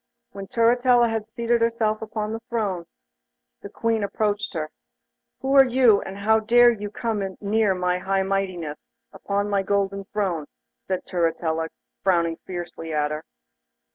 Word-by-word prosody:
When 195 0 -8
Turritella 240 0 +4
had 220 -1 -2
seated 235 +1 0
herself 225 -2 +1
upon 215 0 -3
the 225 - -3
throne, 195 -7 -2 0.7
the 200 - -8
Queen 225 0 0
approached 205 -1 -1
her. 155 -1 -3 0.7
'Who 270 +1 0
are 270 - +10
you, 245 -4 +5
and 195 - -7
how 220 +2 +3
dare 240 +2 +6
you 210 -3 -5
come 205 -4 -3
near 210 -1 +2
my 180 0 0
high 195 +1 0
mightiness, 185 -6 -2 0.3
upon 200 +1 -2
my 200 -1 +1
golden 195 0 -1
throne?' 190 -7 -2 0.4
said 185 -1 -2
Turritella, 165 -2 0 0.3
frowning 170 -3 +2
fiercely 175 -2 -6
at 150 -1 0
her. 155 +1 -4
200 Hz, 145 wpm, -24 LUFS, 180-225 Hz, 0.7 s, are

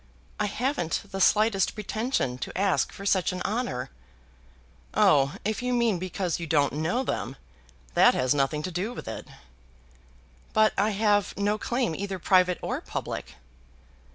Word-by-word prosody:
"I 210 - +1
haven't 230 - -1
the 195 - -3
slightest 210 0 +3
pretension 215 - -2
to - - -5
ask 195 -1 +1
for 200 - -9
such 190 -1 +2
an 180 0 -4
honour." 150 - -2 1.0
"Oh! 140 -1 +4
if 215 +1 -1
you 250 0 -1
mean 230 -6 +2
because 185 -1 -2
you 170 - -5
don't 145 -3 +2
know 165 - 0
them, - - -3 0.6
that 245 - +6
has 130 +1 +2
nothing 145 +2 0
to 185 - -3
do 190 +8 -2
with - - -8
it." - - -6 1.3
"But 215 0 +4
I 205 +2 +2
have 205 -2 +1
no 205 +1 0
claim 240 -6 -1
either 195 +2 -4
private 180 0 +3
or - - -2
public." - - -5
195 Hz, 155 wpm, -27 LUFS, 165-215 Hz, 1.3 s, that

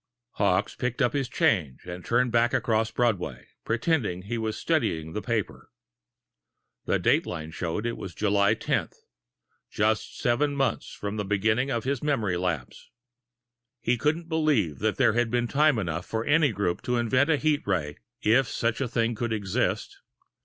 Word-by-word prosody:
Hawkes 95 -3 +1
picked 125 0 -3
up 125 -3 +2
his 135 -4 -1
change 85 - +1
and 90 0 -7
turned 125 +1 +1
back 120 +1 +3
across 110 -1 +1
Broadway, 115 -5 -1 0.2
pretending 115 - 0
he 110 +5 -4
was 110 -1 -2
studying 80 - -1
the 105 - -3
paper. 115 -3 -3 1.2
The - - +2
dateline 80 -2 0
showed 90 +4 -3
it 120 - -2
was 90 -3 -7
July 100 -1 +3
10, - - -1 0.8
just 110 0 0
seven 145 +3 +1
months 135 -1 -1
from 105 +1 -5
the 105 - -1
beginning 110 +6 +1
of 115 -4 -1
his 135 -1 -1
memory 115 -11 0
lapse. 85 -8 -3 0.9
He 125 - +1
couldn't 155 +6 -1
believe 150 - +1
that - - 0
there - - +4
had 120 0 +1
been 120 0 0
time 150 0 +3
enough 85 -4 -3
for 110 +1 -2
any 145 -2 +4
group 95 -4 -1
to 125 0 -1
invent 125 +5 +2
a 155 - +4
heat 150 0 +1
ray, 80 -7 -1 0.2
if 120 +4 +4
such 115 +3 -1
a 135 - 0
thing 115 0 0
could 115 +1 -3
exist. 100 -4 -1
115 Hz, 165 wpm, -27 LUFS, 100-125 Hz, 1.2 s, there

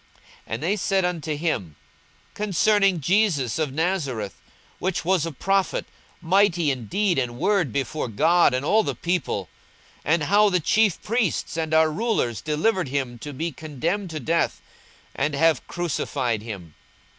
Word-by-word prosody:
And 115 +6 -4
they 195 +6 +1
said 195 -1 +1
unto 160 -4 -2
him, 145 - -2 0.6
Concerning 200 -2 +2
Jesus 165 - +1
of 155 -4 0
Nazareth, 140 - -1 0.5
which 185 -3 -2
was 180 -3 +2
a - - -4
prophet 195 +5 0 0.4
mighty 175 -3 +3
in 125 -5 -5
deed 195 - +1
and 120 -2 -3
word 185 - +1
before 140 +3 -2
God 160 - +3
and 130 +2 -2
all 215 +7 +4
the - - -3
people: 170 - -2 0.6
42:024:020 150 - +2
And 165 - -2
how 205 +6 +4
the 180 -2 +2
chief 210 +3 +2
priests 220 -8 -1
and 160 -1 -2
our 160 0 +4
rulers 175 - -1
delivered 170 +4 0
him 130 -3 -3
to 145 - -7
be 160 +5 -3
condemned 160 +7 -3
to 155 -1 -4
death, 165 +5 0 0.5
and 145 +2 -1
have 165 +2 +2
crucified 135 -9 -2
him. 100 -8 -8
160 Hz, 155 wpm, -24 LUFS, 135-190 Hz, 0.6 s, all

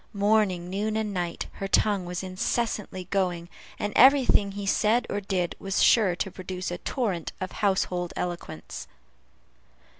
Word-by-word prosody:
Morning, 200 -4 +2
noon, 210 +4 -1
and 215 -2 -2
night, 175 -2 -3
her 195 - -5
tongue 200 -1 +2
was 180 +1 -4
incessantly 190 0 -2
going, 180 -3 0 0.3
and 205 0 -3
every 270 +1 +7
thing 200 -4 +3
he 200 0 -5
said 215 +4 +2
or 205 - -1
did 185 -3 -1
was 195 0 0
sure 205 -7 +5
to 190 - -3
produce 185 -1 -5
a 175 - -4
torrent 200 - -2
of 185 - -4
household 185 -3 0
eloquence. 175 -1 -5
195 Hz, 150 wpm, -27 LUFS, 180-210 Hz, 0.3 s, every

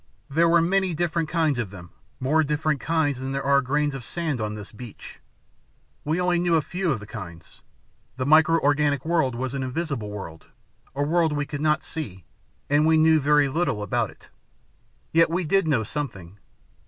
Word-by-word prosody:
There 165 +4 +3
were 170 0 +5
many 190 0 +1
different 165 -1 -1
kinds 160 -6 +1
of 110 -5 -2
them 90 -3 -12 0.3
more 155 +5 +2
different 150 0 0
kinds 155 -5 0
than 130 +1 -4
there 135 0 -2
are 140 0 +4
grains 145 +2 0
of 135 -3 -6
sand 155 -2 -2
on 105 0 -3
this 105 -2 -9
beach. 115 0 -11 0.8
We 155 +3 0
knew 180 - 0
only 175 -1 +1
a 165 -2 +4
few 180 +1 -2
of 130 - -1
the 105 - -10
kinds. 85 -7 -10 0.6
The 130 - -2
micro 160 +3 +5
organic 145 -1 +1
world 160 -7 +1
was 130 +2 -3
an 135 - -3
invisible 130 -4 -3
world, 95 -6 -8 0.5
a 145 - 0
world 160 +1 +2
we 145 0 -1
could 145 0 -6
not 150 0 +2
see, 95 - -7 0.4
and 145 +2 +3
we 160 0 +5
knew 160 0 +5
very 150 0 +3
little 135 -7 -1
about 105 - 0
it. - - -18 0.8
Yet 165 0 +5
we 175 +3 -1
did 195 +2 +2
know 135 -8 +2
something. 100 - -6
150 Hz, 190 wpm, -24 LUFS, 130-160 Hz, 0.8 s, were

